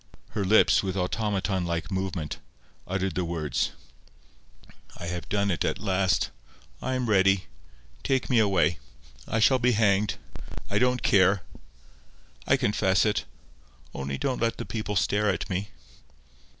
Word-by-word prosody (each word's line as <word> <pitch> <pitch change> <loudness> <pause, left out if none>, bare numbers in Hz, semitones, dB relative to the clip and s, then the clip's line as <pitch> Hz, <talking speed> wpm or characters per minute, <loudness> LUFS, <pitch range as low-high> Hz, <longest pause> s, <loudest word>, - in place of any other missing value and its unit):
Her 105 -2 -2
lips, 105 +3 +5
with 95 -1 -3
automaton 95 0 -1
like 85 +1 -3
movement, 95 -5 -3 0.5
uttered 95 -1 -1
the 90 - -1
words— 80 -5 -1 1.3
"I 85 - -7
have 85 -1 -5
done 100 -1 +1
it 85 - 0
at - - 0
last. 95 -2 +1 0.5
I 130 - -1
am 125 -1 -1
ready. 95 -2 +3 0.6
Take 130 -1 0
me 125 -3 +3
away. 90 -6 +2 0.5
I 110 - 0
shall 130 +4 +4
be 125 0 +3
hanged. 105 -1 +2 0.6
I - - +2
don't 125 -1 +1
care. 95 -1 +4 1.0
I - - +4
confess 95 -2 +2
it. 105 - 0 0.7
Only 70 0 -4
don't 130 - -2
let 115 0 0
the - - -5
people 110 -2 -4
stare 105 +2 +2
at 95 - -1
me." 100 +3 -2
95 Hz, 140 wpm, -27 LUFS, 90-110 Hz, 1.3 s, lips